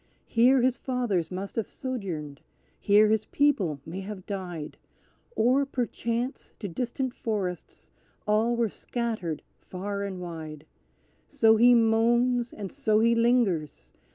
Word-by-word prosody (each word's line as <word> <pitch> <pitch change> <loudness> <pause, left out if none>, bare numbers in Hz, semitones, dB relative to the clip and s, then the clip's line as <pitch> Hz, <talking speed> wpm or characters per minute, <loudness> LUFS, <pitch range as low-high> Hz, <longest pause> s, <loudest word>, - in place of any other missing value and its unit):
Here 245 +2 +4
his 255 0 +1
fathers 235 -11 -1
must 190 +2 -6
have 225 - -1
sojourned 175 - -5 0.4
here 210 +1 +5
his 220 0 +1
people 210 - +1
may 170 +4 -6
have 195 -1 -7
died, 180 -6 -6 0.6
Or, 255 - +3
perchance, 245 -1 -3
to 205 - -5
distant 245 +7 -3
forests 200 -8 -4 0.3
all 220 +3 +2
were 235 -1 +1
scattered 215 - -4 0.2
far 200 +2 -5
and 195 -2 -4
wide. 160 -3 -7 0.6
So 220 0 +4
he 240 +2 +6
moans 235 +2 +3
and 200 -3 -7
so 235 -7 +1
he 230 +1 +4
lingers! 195 - +1
220 Hz, 125 wpm, -27 LUFS, 185-240 Hz, 0.6 s, he